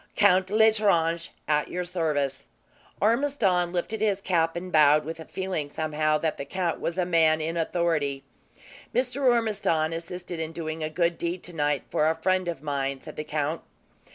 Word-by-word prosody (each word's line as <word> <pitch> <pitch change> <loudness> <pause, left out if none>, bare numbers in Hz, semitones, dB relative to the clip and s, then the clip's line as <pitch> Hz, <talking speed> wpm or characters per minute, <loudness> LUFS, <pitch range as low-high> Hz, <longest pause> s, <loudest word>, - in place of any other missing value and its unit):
"Count 190 -2 +4
L'Estrange, 200 -6 +3 0.2
at 150 -1 +2
your 180 0 -3
service." 150 -6 -1 0.5
Ormiston 215 -7 +2
lifted 185 +5 -3
his 205 -3 +2
cap 165 -4 +1
and 180 +1 -5
bowed, 150 -1 +5
with 165 +1 -6
a 160 - -8
feeling 185 -6 -3
somehow, 155 0 0
that 160 0 -2
the - - -4
count 175 +2 -2
was 170 - -3
a 180 - +1
man 160 -2 +3
in 160 +2 -2
authority. 160 -5 0 0.7
"Mr. 255 +2 0
Ormiston 210 -10 +2
assisted 175 +1 -6
in 160 0 -4
doing 160 -1 -5
a 155 - -2
good 170 +1 0
deed, 170 +1 -3
tonight, 150 -5 -1
for 155 - +2
a 160 - +1
friend 185 +2 0
of 165 -4 -4
mine," 140 -2 -2
said - - -10
the 150 - -4
count. 155 +1 -2
165 Hz, 170 wpm, -26 LUFS, 155-185 Hz, 0.7 s, bowed